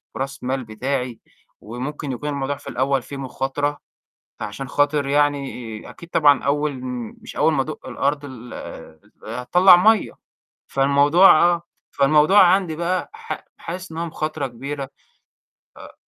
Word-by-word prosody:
وراس 135 -1 -5
مال 130 +1 -2
بتاعي 125 +2 -3 0.4
وممكن 135 +5 -5
يكون 145 +4 -4
الموضوع 140 0 -2
في - - -15
الأول 135 +1 0
فيه 140 +3 -9
مخاطرة، 135 +2 -2 0.6
فعشان 125 +6 -6
خاطر 145 -1 +1
يعني 140 -6 -1
أكيد 170 - -13
طبعًا 145 -3 +4
أول 145 +1 +1
م 125 -3 -5
مش - - -11
أول 160 - +3
ما 135 -3 +2
أدُق 155 -2 -8
الأرض 140 +3 -1
ال 125 -3 -10
آآ، 80 - -10 0.3
أ 115 +3 -5
هتطَلّع 180 +6 +7
مَيّة، 215 +2 +3 0.6
فالموضوع 145 +6 +5
آه، 175 -1 +2 0.3
فالموضوع 150 +8 +5
عندي 180 -3 +3
بقى 180 - -2
ح 455 0 -7
حاسس 180 0 -7
إن 160 - -7
هو 170 - -2
مخاطرة 155 -2 -3
كبيرة، 135 +3 -6 0.9
آآ - - -12
140 Hz, 145 wpm, -22 LUFS, 130-155 Hz, 0.9 s, هتطَلّع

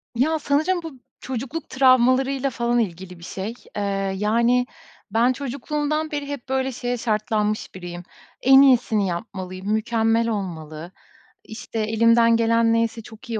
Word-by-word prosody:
Ya, 310 +6 +1
sanırım 310 +6 +1
bu 305 -6 -9 0.2
çocukluk 265 +5 -5
travmalarıyla 260 +1 +3
falan 240 -1 0
ilgili 180 -4 -4
bir - - -14
şey. 195 +5 -5 0.2
Eee, 205 - -2 0.4
yani, 235 +4 +2 0.5
ben 235 +4 +3
çocukluğumdan 295 +4 -3
beri 290 -1 -3
hep, 280 -3 -7
böyle, 265 0 0
şeye 245 0 -3
şartlanmış 215 -2 -1
biriyim. 175 -1 -8 0.4
En 270 +1 +7
iyisini 245 -6 +3
yapmalıyım, 185 +2 -4
mükemmel 225 +1 +1
olmalı. 170 -5 -5 0.5
İşte, 225 0 -7
elimden 230 +1 +4
gelen 230 0 +3
neyse 230 0 0
çok 225 +2 -14
iyi 225 -2 -2
230 Hz, 135 wpm, -22 LUFS, 215-265 Hz, 0.5 s, En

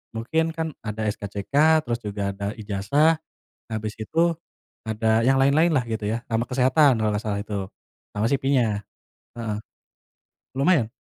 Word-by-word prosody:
mungkin 145 +9 0
kan 160 0 -1
ada 110 0 -4
SKCK, 100 +1 -5 0.3
terus 120 0 -2
juga 100 -2 -3
ada 100 +1 -6
ijazah, 110 +11 +2 0.5
habis 110 -1 -3
itu, 165 +9 +1 0.5
ada 110 0 +2
yang 135 - +4
lain-lainlah 140 +1 +3
gitu 110 -2 -3
ya 115 +3 -2
sama 115 +1 -1
kesehatan 130 +1 +4
kalau 110 -1 +1
gak 105 - -1
salah 105 -3 -2
itu, 100 -3 -4 0.5
sama 105 +2 0
CV-nya. 125 -7 +1 0.5
Heeh. 115 -3 -3 1.0
Lumayan. 140 -6 +3
115 Hz, 135 wpm, -24 LUFS, 105-135 Hz, 1.0 s, yang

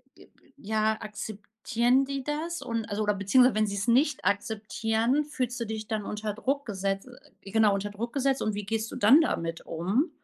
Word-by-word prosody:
b - - -17
b 275 - -29
ja, 215 +1 0
akzeptieren 220 +4 -1
die 275 0 -4
das 315 +4 -3
und, 230 -1 -3
also 210 +1 -1
oder 210 0 +2
beziehungsweise 225 +6 +4
wenn 215 0 +2
sie 200 - -3
es 200 +3 -1
nicht 270 +4 +3
akzeptieren, 220 +5 0
fühlst 255 -4 -3
du 235 - -2
dich 220 -1 -5
dann 215 -2 -2
unter 210 0 -3
Druck 275 +6 -2
gesetzt 195 +1 -3 0.3
genau 210 +1 +3
unter 200 +1 -2
Druck 225 +4 -5
gesetzt 275 -1 +1
und 215 - 0
wie 205 -1 -4
gehst 220 +1 -2
du - - -8
dann 250 +9 +7
damit 165 - -1
um? 195 - 0
220 Hz, 195 wpm, -28 LUFS, 205-255 Hz, 0.3 s, dann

